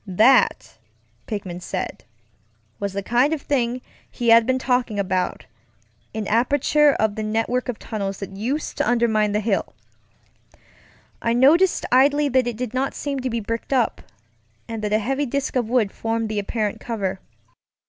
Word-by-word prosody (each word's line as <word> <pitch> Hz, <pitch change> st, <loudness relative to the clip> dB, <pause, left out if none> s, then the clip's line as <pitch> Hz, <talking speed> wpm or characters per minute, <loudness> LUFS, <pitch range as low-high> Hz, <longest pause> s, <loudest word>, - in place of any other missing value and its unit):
That, 215 Hz, -, +3 dB, 0.5 s
Pickman 185 Hz, -4 st, -5 dB
said, -, -, -5 dB, 0.7 s
was 200 Hz, -1 st, -3 dB
the 200 Hz, 0 st, -3 dB
kind 245 Hz, +8 st, +2 dB
of 300 Hz, -, -4 dB
thing 250 Hz, -3 st, 0 dB, 0.3 s
he 240 Hz, -1 st, -2 dB
had 230 Hz, 0 st, +6 dB
been 260 Hz, 0 st, +2 dB
talking 250 Hz, -4 st, 0 dB
aboutŌĆöan 185 Hz, -2 st, -1 dB, 0.8 s
aperture 285 Hz, +6 st, +3 dB
of 220 Hz, -3 st, 0 dB
the 220 Hz, -, -5 dB
network 225 Hz, +4 st, -1 dB
of 240 Hz, -, -3 dB
tunnels 195 Hz, -3 st, -4 dB
that 195 Hz, -1 st, -7 dB
used 255 Hz, +10 st, -3 dB
to 290 Hz, -, +1 dB
undermine 220 Hz, -3 st, +2 dB
the 210 Hz, -, +1 dB
hill. 210 Hz, -2 st, -1 dB, 1.5 s
I 230 Hz, -, +1 dB
noticed 315 Hz, +10 st, +4 dB
idly 285 Hz, +3 st, +4 dB
that 260 Hz, -1 st, +2 dB
it 235 Hz, -3 st, -3 dB
did 250 Hz, -1 st, -4 dB
not 265 Hz, +1 st, -1 dB
seem 280 Hz, -2 st, -3 dB
to 255 Hz, 0 st, -2 dB
be 230 Hz, -1 st, -2 dB
bricked 230 Hz, +5 st, -4 dB
up, 245 Hz, -4 st, +1 dB, 0.7 s
and 225 Hz, -2 st, -5 dB
that 210 Hz, -, -1 dB
a 215 Hz, -, +4 dB
heavy 270 Hz, +6 st, -1 dB
disk 280 Hz, +3 st, -2 dB
of 240 Hz, -3 st, 0 dB
wood 235 Hz, -5 st, +2 dB
formed 225 Hz, -1 st, -2 dB
the 215 Hz, -1 st, -1 dB
apparent 210 Hz, 0 st, -2 dB
cover. 200 Hz, -5 st, -3 dB
235 Hz, 160 wpm, -22 LUFS, 210-260 Hz, 1.5 s, had